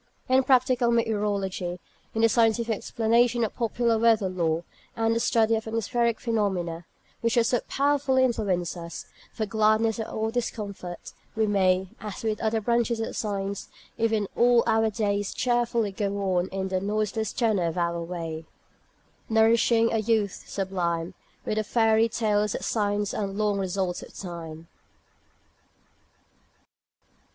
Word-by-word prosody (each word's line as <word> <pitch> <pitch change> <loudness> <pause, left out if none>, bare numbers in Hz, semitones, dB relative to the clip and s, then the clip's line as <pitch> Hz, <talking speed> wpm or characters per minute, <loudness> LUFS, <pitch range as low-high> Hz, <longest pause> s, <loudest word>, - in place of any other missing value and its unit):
In 260 +1 +4
practical 255 -2 +3
meteorology, 205 -6 -1 0.4
in 225 - +1
the - - +8
scientific 225 0 +2
explanation 235 +3 +1
of 220 - -2
popular 230 -1 +1
weather 225 -4 +3
lore, 170 -2 -1 0.3
and 225 - -1
in 225 - +3
the 230 - 0
study 225 -1 +3
of 220 0 -4
atmospheric 230 +1 0
phenomena, 190 -7 -1 0.3
which 230 +1 0
so 235 +1 +2
powerfully 280 -2 +2
influence 195 -9 0
us, 170 -1 -7 0.3
for 220 - -3
gladness 220 +1 +2
or 220 0 -2
discomfort, 200 -7 -5 0.2
we 220 0 +2
may, 190 -2 +2
as 210 0 -7
with 215 -2 -1
other 220 0 +1
branches 235 +1 +1
of 225 - -3
science, 200 -2 -3 0.3
even 220 -3 +1
all 240 0 +5
our 225 -1 +3
days, 205 -1 -1
cheerfully 235 -3 +1
go 200 0 -2 0.2
on 175 +1 +1
in 190 0 -3
"the 185 -1 -1
noiseless 215 +1 -1
tenor 220 -7 +1
of 165 - -4
our 170 -1 0
way," 165 -2 -5 0.8
"Nourishing 225 +1 +4
a 225 - +2
youth 215 -3 0
sublime, 175 -4 -2 0.3
With 215 - -2
the 215 - +1
fairy 225 +1 +3
tales 210 -2 0
of - - -4
science 205 -2 0
and 200 -2 -2
the 215 - 0
long 205 -1 +1
results 185 -1 -2
of - - -12
time." 165 -3 -8
215 Hz, 145 wpm, -26 LUFS, 190-230 Hz, 0.8 s, the